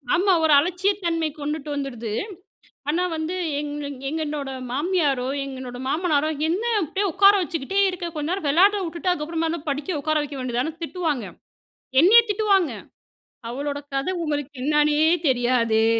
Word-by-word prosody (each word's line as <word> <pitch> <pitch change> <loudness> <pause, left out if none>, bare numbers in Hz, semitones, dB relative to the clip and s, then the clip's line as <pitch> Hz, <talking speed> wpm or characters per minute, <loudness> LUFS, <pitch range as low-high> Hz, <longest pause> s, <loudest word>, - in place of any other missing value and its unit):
ஆமா. 380 +1 +3
ஒரு 310 -2 +5
அலட்சியத்தன்மை 350 -1 0
கொண்டுட்டு 300 0 -4
வந்துடுது. 240 -6 -4 0.8
ஆனா, 345 +4 +1
வந்து 320 +3 -3 0.2
எங் 295 -1 -4 0.4
எங்களோட 300 -3 -3 0.2
மாமியாரோ, 285 -4 0 0.2
எங்களோட 260 -2 -7
மாமனாரோ 310 -1 +1 0.2
என்ன 370 +8 -1 0.2
அப்டியே 385 +6 -1
உட்கார 395 +2 +6
வச்சுக்கிட்டே 335 +3 -2
இருக்க, 360 -1 -5
கொஞ்ச 300 +1 -3
நேரம் 370 -6 -2
வெளாட 380 +8 +5
வுட்டுட்டு 345 +2 -1
அதுக்கப்புறமா 325 0 -2
என்ன 340 - -3
படிக்க 290 +3 -2
உட்கார 310 0 +1
வைக்க 290 -1 -7
வேண்டியதுதானே 255 +4 -1
திட்டுவாங்க. 315 - -2 0.8
என்னையே 440 +8 +8
திட்டுவாங்க. 400 -4 +2 0.8
அவளோட 280 +3 -3
கத 275 +4 -1
உங்களுக்கு 290 -3 -2
என்னான்னே 300 +1 +3 0.2
தெரியாதே 240 -3 +2
310 Hz, 130 wpm, -23 LUFS, 280-355 Hz, 0.8 s, என்னையே